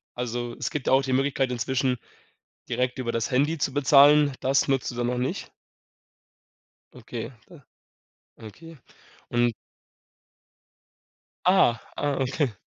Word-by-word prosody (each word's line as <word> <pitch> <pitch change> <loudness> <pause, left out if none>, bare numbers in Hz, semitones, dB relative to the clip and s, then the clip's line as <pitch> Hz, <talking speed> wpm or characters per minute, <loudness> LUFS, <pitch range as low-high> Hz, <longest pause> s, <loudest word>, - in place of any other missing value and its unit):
also 120 -1 -4
es - - -3
gibt 145 -3 -4
ja - - +3
auch 135 +1 +4
die 130 -1 -2
Möglichkeit 135 -1 +1
inzwischen, 125 +2 -1 0.7
direkt 125 +1 -1
über 120 -2 -2
das 115 -1 -2
Handy 145 +6 +1
zu 140 - -2
bezahlen. 145 +1 +5
Das 135 +1 +1
nutzt 135 -2 0
du - - -9
dann 120 0 -2
noch 125 - -1
nicht? 125 +2 -3 1.4
Okay 125 - -7 0.2
da 155 -6 -16 0.8
okay. 150 - -12 0.5
Und 120 -1 +1 1.9
Ah, 180 -11 +4 0.2
ah 145 -1 -1
okay. 135 0 -1
130 Hz, 130 wpm, -25 LUFS, 120-145 Hz, 1.9 s, bezahlen